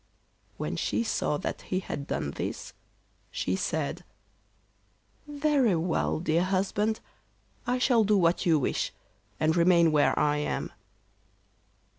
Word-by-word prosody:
When - - -3
she - - 0
saw 220 -9 -1
that - - -4
he 185 - -2
had 145 -6 -6
done 70 - -2
this, - - -5 0.6
she 90 - -2
said: 160 - -2 1.2
'Very 285 - +2
well, 165 -1 0
dear 165 +1 +1
husband, 195 +3 0 0.7
I 250 +1 +1
shall 245 -3 +3
do 210 0 +3
what 170 -2 +2
you 165 -3 +4
wish, 140 - -1 0.5
and 155 +1 +2
remain 170 -1 +5
where 150 -1 +3
I 150 0 +2
am. 150 - -2
175 Hz, 125 wpm, -28 LUFS, 155-215 Hz, 1.2 s, remain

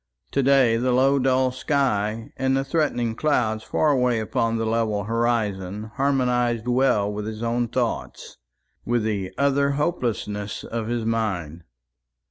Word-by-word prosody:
To - - +1
day 130 -4 +4
the 125 +2 0
low 135 +3 +3
dull 130 0 +2
sky 115 -5 -1
and 130 0 +1
the 135 - 0
threatening 135 -6 0
clouds 110 -5 0
far 155 - +1
away 125 -4 +2
upon 115 +1 -1
the 115 - -1
level 110 -2 0
horizon 110 -3 -1
harmonised 125 -4 +1
well 120 -5 +2
with 105 0 -4
his 110 +1 -5
own 120 +1 0
thoughts - - -3 0.5
with 120 -1 0
the 100 -4 -2
utter 140 0 +2
hopelessness 115 - -2
of 115 -1 -4
his 120 -1 -2
mind. 90 -8 -2
115 Hz, 140 wpm, -24 LUFS, 110-130 Hz, 0.5 s, day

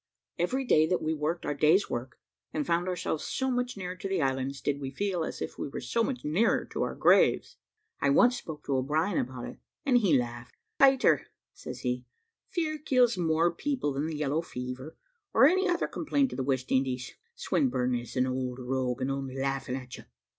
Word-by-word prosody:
Every 260 +10 0
day 155 -9 +4
that 180 +1 +1
we 155 +1 -1
worked 160 +3 -2
our 145 - 0
day's 155 +7 +4
work, 120 +1 -5 0.3
and 150 -2 -2
found 170 +1 +1
ourselves 180 -3 -2
so 265 0 -1
much 245 -2 -1
nearer 180 -1 -4
to 195 +2 -5
the 195 - 0
islands, 135 -1 -1
did 140 -1 -1
we 135 - -3
feel 180 +4 -1
as - - -4
if - - -7
we - - -3
were - - -5
so 230 - 0
much 255 +1 -3
nearer 175 +10 +2
to - - -2
our - - -1
graves. - - +4 0.4
I 140 - +3
once 245 - +5
spoke 155 -2 -9
to 140 - 0
O'Brien 155 +9 +1
about 125 -1 -4
it, - - -9 0.3
and 255 -3 +5
he 180 - +4
laughed. 120 0 -5 0.2
"Peter," 270 -1 +5 0.3
says - - -8
he, 125 0 -1 0.5
"fear 315 -4 -2
kills 250 -5 +3
more 165 -1 +2
people 255 - -1
than 140 +3 -1
the 160 -2 -4
yellow 150 +1 0
fever, 125 -1 -7 0.4
or - - +8
any 375 +5 +4
other 345 -1 +1
complaint 285 -4 0
of - - -6
the 135 - -1
West 130 -1 -1
Indies. 130 -1 0 0.2
Swinburne 130 - 0
is 120 0 -4
an 130 0 +3
old 130 -1 -2
rogue, 130 -1 -2
and 130 +1 0
only 135 -1 -4
laughing 135 -1 -2
at 125 -1 -7
you. - - -13
155 Hz, 205 wpm, -29 LUFS, 130-205 Hz, 0.5 s, or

